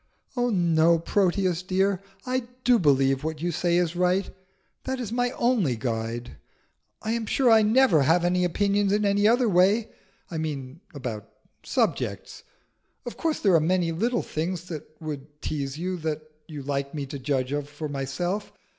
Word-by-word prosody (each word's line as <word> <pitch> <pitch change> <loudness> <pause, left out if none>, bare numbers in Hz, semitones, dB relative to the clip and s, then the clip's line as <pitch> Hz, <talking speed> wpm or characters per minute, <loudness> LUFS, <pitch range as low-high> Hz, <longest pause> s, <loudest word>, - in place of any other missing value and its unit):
"Oh 245 -1 +1
no, 170 -4 +3
Proteus, 185 0 +1
dear. 190 +1 +1 0.2
I 255 -1 -1 0.2
do 245 -2 +5
believe 135 -3 +3
what 160 -1 -3
you 175 +2 -1
say 170 +2 +1
is 175 -1 0
right. 180 +2 +1 0.5
That 265 0 -2
is 230 -4 -4
my 245 +1 +1
only 225 - +1
guide. 115 +1 -4 0.7
I 220 - -1
am 230 -1 -2
sure 255 0 +3
I 220 -1 +7
never 215 - +4
have 165 +5 +3
any 180 +1 +2
opinions 200 +3 +1
in 210 +1 +2
any 205 +1 +3
other 240 +2 +4
way: 200 +4 +3 0.4
I 160 - -3
mean 145 -1 -5
about 120 -7 -5 0.3
subjects. - - -1 0.6
Of 240 - -6
course 325 -2 -1
there 195 -4 +4
are 165 - +6
many 170 +1 +1
little 235 +9 0
things 170 +2 -3
that 155 -4 -6
would 150 -2 -7
tease 140 -2 -3
you, 180 +2 -2
that 155 -2 -3 0.2
you 150 -3 -7
like 140 +1 -3
me 145 -2 -3
to 140 +1 -7
judge 130 -1 -1
of 145 0 -2
for 150 +1 -5
myself. 145 +9 -3
175 Hz, 170 wpm, -26 LUFS, 145-205 Hz, 0.7 s, I